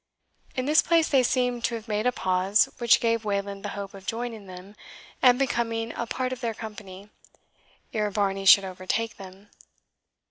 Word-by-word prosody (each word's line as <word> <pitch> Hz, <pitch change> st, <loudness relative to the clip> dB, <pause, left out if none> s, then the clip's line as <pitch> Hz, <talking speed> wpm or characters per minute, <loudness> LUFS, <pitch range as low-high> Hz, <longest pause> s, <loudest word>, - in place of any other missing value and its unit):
In 255 Hz, -, -2 dB
this 300 Hz, +3 st, +5 dB
place 330 Hz, -1 st, +2 dB
they 270 Hz, -3 st, +4 dB
seemed 250 Hz, -1 st, 0 dB
to 235 Hz, -, -1 dB
have 225 Hz, 0 st, -8 dB
made 215 Hz, +2 st, 0 dB
a -, -, +3 dB
pause, 190 Hz, -1 st, +2 dB
which 235 Hz, -1 st, +5 dB
gave 230 Hz, -1 st, 0 dB
Wayland 200 Hz, -1 st, -3 dB
the -, -, -4 dB
hope 200 Hz, -1 st, -6 dB
of 195 Hz, -1 st, -13 dB
joining 225 Hz, -3 st, -4 dB
them, 185 Hz, +3 st, -11 dB, 0.5 s
and 250 Hz, -1 st, +6 dB
becoming 230 Hz, -3 st, -1 dB
a 235 Hz, -, -4 dB
part 255 Hz, +2 st, -2 dB
of 255 Hz, -, -8 dB
their 230 Hz, -2 st, -2 dB
company, 205 Hz, -2 st, -10 dB, 0.8 s
ere 210 Hz, -1 st, 0 dB
Varney 195 Hz, -1 st, -1 dB
should 190 Hz, +1 st, +8 dB
overtake 190 Hz, +5 st, -3 dB
them. 195 Hz, +1 st, -13 dB
220 Hz, 175 wpm, -26 LUFS, 195-240 Hz, 0.8 s, should